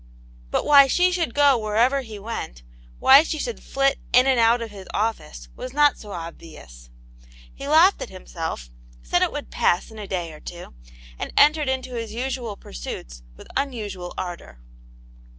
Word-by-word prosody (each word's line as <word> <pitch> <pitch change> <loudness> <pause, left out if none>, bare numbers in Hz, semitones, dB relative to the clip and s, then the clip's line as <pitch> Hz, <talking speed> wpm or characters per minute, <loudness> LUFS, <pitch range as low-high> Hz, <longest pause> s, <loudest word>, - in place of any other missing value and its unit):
But - - -1
why 280 -2 +7
she 360 +7 +3
should 340 -9 -2
go 285 -3 +5
wherever 230 +6 +2
he 220 -4 -9
went, 200 - -6 0.3
why 270 +2 +8
she 315 0 -3
should 475 +9 -4
flit 275 0 0
in 250 +1 +6
and 265 -2 +3
out 230 +1 +4
of 230 -2 -6
his 195 -2 -11
office 205 - -3
was 255 - -7
not 295 0 +3
so 210 - -10
obvious. 160 - -10 0.6
He 275 - -8
laughed 325 +6 +5
at - - -5
himself, 165 - -6 0.3
said - - +1
it - - +2
would - - -7
pass 175 - +1
in 220 - -11
a 205 - -7
day 175 -4 -4
or 155 - -12
two, 175 - -10 0.5
and - - -4
entered 300 -1 +5
into 260 -1 -3
his 230 -2 -5
usual 245 -4 -4
pursuits - - -8 0.2
with - - -13
un 275 0 0
usual 200 -6 -6
ardour. 175 - -7
225 Hz, 175 wpm, -23 LUFS, 175-275 Hz, 0.6 s, why